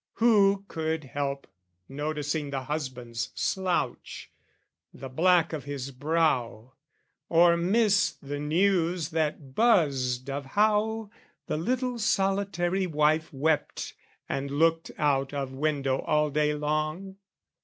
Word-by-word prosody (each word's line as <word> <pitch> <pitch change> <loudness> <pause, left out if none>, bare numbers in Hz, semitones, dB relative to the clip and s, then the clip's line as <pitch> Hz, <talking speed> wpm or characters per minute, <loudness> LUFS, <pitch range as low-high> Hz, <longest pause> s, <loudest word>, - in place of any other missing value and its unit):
Who 200 -4 +3
could 160 -2 -2
help 140 +1 -3 0.4
noticing 150 +1 -3
the 135 -1 -3
husband's 130 -5 -4
slouch, 185 -2 -2 0.6
The 135 - -9
black 170 +4 +3
of 145 -4 -5
his 140 -2 -5
brow 130 -5 0 0.6
or 170 +1 +5
miss 200 +4 +3
the 145 +1 -7
news 170 +1 +1
that 150 -4 -2
buzzed 135 - +2
Of 140 +1 -3
how 215 0 +2 0.3
the - - -2
little 250 +7 -1
solitary 195 -2 0
wife 155 0 +1
Wept 150 +2 -1 0.3
and 135 +1 -3
looked 165 +3 +1
out 140 -2 +1
of 135 -2 -3
window 140 -2 0
all 150 -1 +1
day 150 +1 +1
long? 155 +6 -2
155 Hz, 110 wpm, -27 LUFS, 140-185 Hz, 0.6 s, or